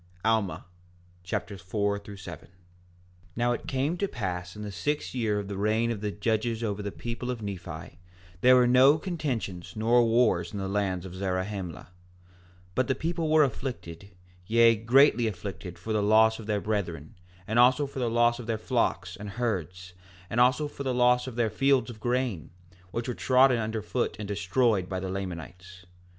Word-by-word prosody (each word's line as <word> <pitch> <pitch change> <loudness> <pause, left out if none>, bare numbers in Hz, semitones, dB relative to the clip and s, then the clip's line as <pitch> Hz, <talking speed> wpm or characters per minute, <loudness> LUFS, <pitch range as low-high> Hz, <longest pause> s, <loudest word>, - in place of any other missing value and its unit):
Alma 110 -4 +1 0.6
Chapter 95 +2 -4
4 100 +3 -1
4:1 95 -5 -10 0.9
Now 120 +1 +1
it 120 - -4
came 140 +6 -1
to 200 - 0
pass 90 - -4
in 105 - -7
the 105 - -5
sixth 145 +9 -2
year 110 -5 0
of 100 -1 -4
the 100 -1 -5
reign 110 +3 +1
of 110 -3 -4
the 105 - -1
judges 110 +2 -1
over 105 -2 -2
the 100 0 -4
people 120 +3 -5
of 120 -3 -4
Nephi, 85 -4 -7 0.4
there 130 0 +7
were 125 -1 +5
no 130 +4 +6
contentions 135 - -4
nor 115 +3 +4
wars 115 -6 +2
in - - -4
the 95 -1 -3
land 95 -2 -1
of 90 - -8
Zarahemla; 95 -2 -3
4:2 - - -19 0.9
But 130 +5 +1
the 130 - +1
people 165 +2 -2
were 155 0 +6
afflicted, 110 - -5 0.4
yea, 115 0 +5
greatly 120 +1 +4
afflicted 90 -4 -6
for 110 +6 -4
the 105 - +2
loss 110 +2 +4
of 110 - -9
their 105 -2 0
brethren, 85 -8 -3 0.3
and 110 +4 +1
also 130 +4 +5
for 135 -1 -7
the 120 -2 0
loss 120 +1 +3
of 120 - -8
their 115 -1 0
flocks 105 -7 -1
and 105 +3 -7
herds, 90 -6 -3 0.4
and 120 - 0
also 130 +4 +4
for 145 - -10
the 130 -2 -1
loss 125 0 +3
of 125 - -6
their 115 -3 +1
fields 135 +2 +2
of 110 - -12
grain, 120 -6 -1 0.4
which 115 +5 -4
were 125 - -1
trodden 130 0 +4
under 110 -1 -3
foot 120 +3 -1
and 105 -1 -6
destroyed 100 +1 +1
by 95 -1 -2
the 95 0 -4
Lamanites. 90 -1 -7
110 Hz, 185 wpm, -28 LUFS, 95-125 Hz, 0.9 s, there